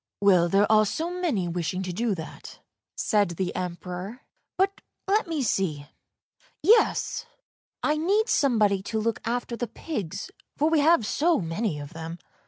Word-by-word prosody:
Well, 185 -4 +4
there 195 +3 +4
are 215 -1 +6
so 330 - -2
many 330 - -1
wishing 175 +2 -2
to 180 -1 -4
do 220 +2 0
that," 160 -2 -9 0.4
said 205 -3 +2
the 185 -2 -2
Emperor; 180 +5 -5 0.2
" - - -52
but 390 +1 +1 0.3
let 415 +1 +2
me 315 -4 -1
see! 170 - 0 0.4
— - - -36
yes, 455 +4 +3 0.6
I 300 0 +2
need 400 +8 +2
somebody 215 -8 +3
to 220 +3 -3
look 225 +1 -1
after 240 +1 -2
the 240 +1 -3
pigs, 200 - -5 0.3
for 305 +2 +2
we 320 - +4
have 300 -5 +4
so 325 +9 +2
many 165 0 -2
of 145 0 -8
them." 165 +1 -6
215 Hz, 165 wpm, -26 LUFS, -, 0.6 s, are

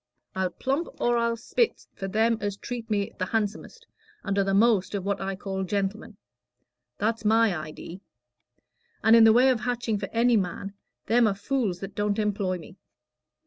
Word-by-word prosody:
I'll 190 -1 -1
plump 270 - -2
or 240 0 +2
I'll 235 0 0
split 460 - -1
for 195 - -5
them 225 +3 +1
as 205 -1 -3
treat 235 0 -6
me 200 -2 0
the 185 - -1
handsomest 225 - -3 0.4
and 200 -1 -1
are - - +4
the 195 - -1
most 210 -2 +3
of 195 -2 -3
what 200 -1 -1
I 195 0 -3
call 190 0 -4
gentlemen; 200 +3 -3 0.8
that's 225 +1 -1
my 220 -2 +3
idee. 155 +3 -8 1.0
And 225 +1 +7
in 230 -1 +8
the 220 - +8
way 250 +3 +5
of 250 -3 +2
hatching 240 -2 -2
for 195 - -5
any 235 0 +3
man, 195 +1 -3 0.3
them 235 +1 +4
are 200 - 0
fools 205 -3 -2
that 195 0 -6
don't 205 0 -1
employ 205 -3 -1
me." 180 +2 -13
210 Hz, 180 wpm, -26 LUFS, 195-230 Hz, 1.0 s, in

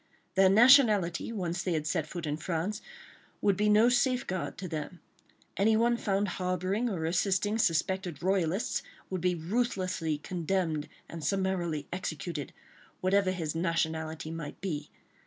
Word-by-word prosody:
Their 190 0 +5
nationality, 215 -5 +5
once 175 -5 -2
they 180 - -1
had 155 -2 -1
set 155 0 -1
foot 170 +1 -5
in 150 0 -2
France, 180 +6 -2 0.6
would 200 -2 +2
be 210 +2 +2
no 215 +3 +6
safeguard 245 -6 0
to 185 - -5
them. 160 +2 -5 0.6
Anyone 225 +4 +3
found 205 -3 0
harbouring 185 +6 0
or 170 -6 -2
assisting 195 +5 +1
suspected 175 -3 0
royalists 190 +1 0 0.3
would 185 -2 -2
be 180 0 +1
ruthlessly 185 -4 -1
condemned 165 -2 -2 0.2
and 165 -2 -8
summarily 175 -4 -1
executed, 165 -4 -4 0.5
whatever 195 +1 +2
his 165 -5 -2
nationality 160 -2 -1
might 165 -3 -6
be. 155 -6 -4
185 Hz, 135 wpm, -30 LUFS, 160-200 Hz, 0.6 s, no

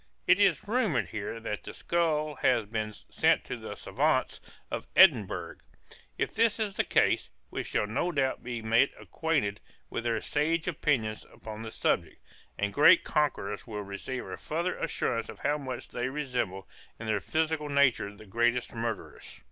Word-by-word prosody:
It 185 - +5
is 195 -2 +3
rumored 200 - +1
here 105 +2 -4
that 105 -2 -4
the - - -9
skull 155 -3 0
has 120 -4 +2
been 110 0 -3
sent 105 - +1
to - - -4
the - - -7
savans - - 0 0.3
of - - -4
Edinburg; 135 - +5 0.6
if - - -1
this 230 -1 +3
be 220 -2 0
the 195 - -1
case, - - +2 0.2
we - - -2
shall - - -1
no 130 +11 -1
doubt 135 -4 0
be 120 -2 -4
made 115 +5 +4
acquainted 145 -11 -1 0.3
with 115 - -3
their 115 -1 +1
sage 160 +7 0
opinions 135 -10 0
upon 110 0 -9
the 115 - -5
subject, - - -1 0.4
and 100 -1 -1
great 145 - +7
conquerors 130 -10 -1
will 105 -2 -4
receive 100 +6 -5
a - - -6
farther 170 +4 -2
assurance 120 -7 -1
of - - -8
how 145 +1 +1
much 130 -3 -6
they 125 +1 -2
resemble 125 -9 -3 0.3
in 115 - -6
their 110 -2 0
physical 155 +1 -1
natures 130 -8 +2
the 110 - -12
greatest 120 +4 +1
murderers. 115 -3 -5
125 Hz, 165 wpm, -29 LUFS, 110-155 Hz, 0.6 s, great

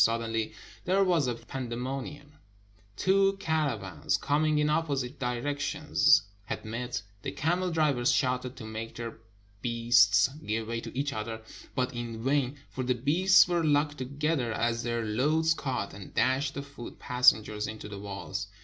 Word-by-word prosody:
Suddenly 115 -1 0 0.3
there 190 +2 +3
was 170 -7 +2
a 120 - -1
pandemo 125 +2 -4
nium: 145 +2 -10 0.6
two 195 - +3
caravans 120 - -1
coming 155 +1 +1
in 150 0 +2
opposite 145 -4 -1
directions 145 +4 +2 0.2
had - - -5
met, 115 0 -4 0.2
the - - -4
camel 175 +5 0
drivers 150 -7 +2
shouted 125 -1 0
to 110 - -9
make 110 +1 -6
their 115 -1 -6 0.4
beasts 115 -4 +4 0.2
give 110 +1 -2
way 115 0 -3
to - - -8
each 140 0 -1
other, 110 -1 -5 0.3
but 130 -1 0
in 115 -2 -5
vain; 135 0 +1
for 130 - -3
the 125 0 +1
beasts 165 +12 +5
were 175 -1 +1
locked 145 -1 +2
together 140 -1 -1
as 115 +1 0
their 120 -1 -2
loads 150 +9 +2
caught, 130 -10 -3
and 100 -1 -11
dashed 130 +3 +1
the 140 - -4
foot 140 -4 -10
pas 125 0 +6
sengers 105 0 -5
into 110 -1 -7
the 100 -1 -7
walls. 100 -1 -5
125 Hz, 160 wpm, -29 LUFS, 115-145 Hz, 0.6 s, pas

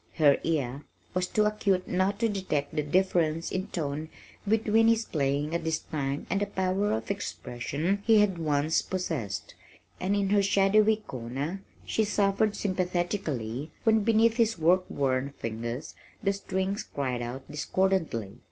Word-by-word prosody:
Her 145 -3 +5
ear 140 -4 -1 0.3
was 185 0 0
too 210 +2 +2
acute 200 -3 +1
not 190 +2 +1
to 230 - +4
detect 185 -9 -2
the 150 - +2
difference 165 0 +1
in 185 0 -2
tone 155 -1 -3 0.4
between 220 +1 +3
his 225 0 +3
playing 145 +1 -1
at 170 - -1
this 160 -1 0
time 140 -3 -3
and 195 - 0
the 205 - +1
power 190 +1 0
of 110 - -2
expression 155 +11 -2
he 225 0 +5
had 195 -4 +2
once 150 0 +1
possessed, 155 - -3 0.5
and 195 +2 0
in 200 -1 +1
her 205 -1 +5
shadowy 200 +2 +4
corner 140 - -5 0.2
she 220 - +1
suffered 205 0 +1
sympathetically 175 - -2
when 220 -1 +4
beneath 225 +2 +3
his 225 -3 +2
work 180 +3 +3
worn 135 0 0
fingers 115 +5 -4 0.3
the 195 -1 +2
strings 195 0 -2
cried 130 -4 -3
out 125 +3 -5
discordantly. 150 - -1
180 Hz, 150 wpm, -28 LUFS, 145-200 Hz, 0.5 s, Her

